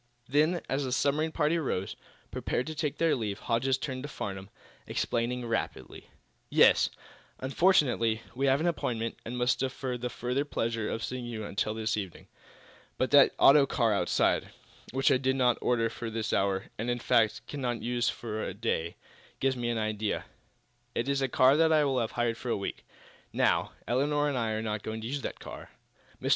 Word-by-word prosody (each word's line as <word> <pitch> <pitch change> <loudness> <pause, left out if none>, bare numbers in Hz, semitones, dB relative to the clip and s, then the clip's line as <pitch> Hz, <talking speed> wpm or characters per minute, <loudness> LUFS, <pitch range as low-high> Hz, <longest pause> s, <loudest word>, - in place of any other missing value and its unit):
Then, 155 +6 +2
as 135 +1 -1
the 130 - -3
submarine 145 +4 +1
party 155 +2 +1
rose, 95 - -2 0.4
prepared 125 - -2
to 155 - -5
take 150 -2 -2
their 165 -1 +3
leave, 105 -5 -3
Hodges 125 +3 0
turned 130 -2 -4
to 145 - -6
Farnum, 95 -6 -6 0.4
explaining 120 +1 -1
rapidly: 115 - -4 0.4
"Yes; - - +5 0.5
unfortunately, 130 - +2
we 135 +2 0
have 135 +1 +4
an 160 - -1
appointment, 115 -9 -1
and 120 +2 -5
must 125 +1 +2
defer 130 -1 -3
the 125 +1 -3
further 125 +4 -1
pleasure 115 -6 -2
of 115 - -3
seeing 125 -1 -4
you 110 -3 -5
until 105 +2 -2
this 110 0 -1
evening. 95 -4 -6 0.7
But 130 - 0
that 145 -1 +6
auto 140 0 +7
car 115 -5 +2
outside, 100 - +1 0.4
which 135 +1 +2
I - - +5
did 130 0 0
not 125 -2 +2
order 115 -2 +2
for 115 0 -5
this 110 -1 -3
hour, 95 0 0
and, 115 +3 -2
in 120 - 0
fact, 115 -2 +2
cannot 125 -5 -3
use 120 0 +1
for 110 -2 -4
to 95 - -4
day, 95 -6 -2 0.4
gives 135 0 +1
me 120 -1 -2
an 120 - 0
idea. 110 -1 -2 0.7
It 115 - -1
is 140 0 +1
a 135 - +2
car 130 +2 +5
that 160 0 +4
I 155 -2 +4
have 110 - -3
hired 120 -1 0
for 125 - -6
a - - +1
week. 100 - -5 0.5
Now, - - +2
Elinor 145 +5 +1
and 140 - -2
I 115 -3 0
are 110 +1 -2
not 105 -1 -2
going 110 +1 -5
to 110 - -4
use 140 +3 -3
the - - -3
car. - - -10 0.5
Mr. - - -2
120 Hz, 190 wpm, -29 LUFS, 110-135 Hz, 0.7 s, auto